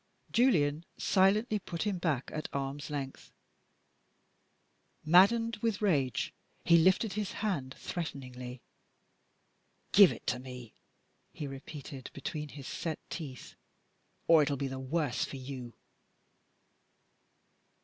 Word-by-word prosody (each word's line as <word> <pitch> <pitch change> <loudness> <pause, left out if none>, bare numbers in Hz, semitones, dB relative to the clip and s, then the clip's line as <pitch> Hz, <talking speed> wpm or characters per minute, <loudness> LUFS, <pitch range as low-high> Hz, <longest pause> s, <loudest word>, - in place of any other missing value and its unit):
Julian 165 - +3
silently 210 +3 +3
put 170 -3 -4
him 205 -4 -1
back 155 -7 -1
at 155 - -4
arms 140 +2 -3
length. 140 -2 -5 1.7
Maddened 210 +7 +5
with 215 -1 0
rage, 145 - +1 0.3
he 170 -1 +7
lifted 190 +5 +3
his 210 -1 -2
hand 160 -12 -2
threateningly. 125 -6 -6 1.3
"Give 200 -3 +8
it - - -8
to 125 - 0
me!" 125 -3 -9 0.6
he 150 - -6
repeated 135 0 -8
between 150 -1 -4
his 140 -2 -9
set 160 -3 -3
teeth, 140 -7 -7 0.7
"or 165 -2 +7
it 145 - +2
will 140 - -1
be 140 +1 -1
the 135 0 -5
worse 135 -1 0
for 135 - -5
you!" 130 -3 -7
150 Hz, 115 wpm, -32 LUFS, 135-190 Hz, 1.7 s, Give